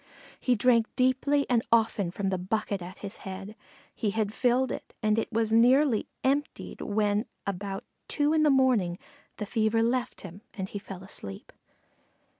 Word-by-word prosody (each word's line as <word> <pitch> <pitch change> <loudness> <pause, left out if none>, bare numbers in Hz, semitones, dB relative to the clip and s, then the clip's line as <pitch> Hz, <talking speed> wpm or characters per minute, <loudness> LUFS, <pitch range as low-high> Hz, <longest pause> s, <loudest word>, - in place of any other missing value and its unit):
He 250 - +2
drank 230 0 +4
deeply 265 +3 +2
and 240 -2 +3
often 220 -5 +3
from 195 +2 -2
the 185 -1 -1
bucket 200 +1 -2
at 180 +1 -8
his 195 - -6
head. 195 +2 -7 0.4
He 215 - -1
had 210 0 -1
filled 250 +2 +2
it, - - -7
and 215 +1 +3
it - - -3
was 225 -1 +1
nearly 250 +1 +4 0.2
emptied 280 +3 -1
when 210 +1 0 0.2
about 195 0 -4 0.2
two 295 +1 +1
in 315 - +3
the 305 - +5
morning 250 -10 +3 0.4
the 210 - -3
fever 220 +1 +1
left 240 +1 -1
him 190 +1 -10
and 190 -3 -3
he 205 - -5
fell 195 -2 -9
asleep. 100 - -8
220 Hz, 165 wpm, -28 LUFS, 195-250 Hz, 0.4 s, the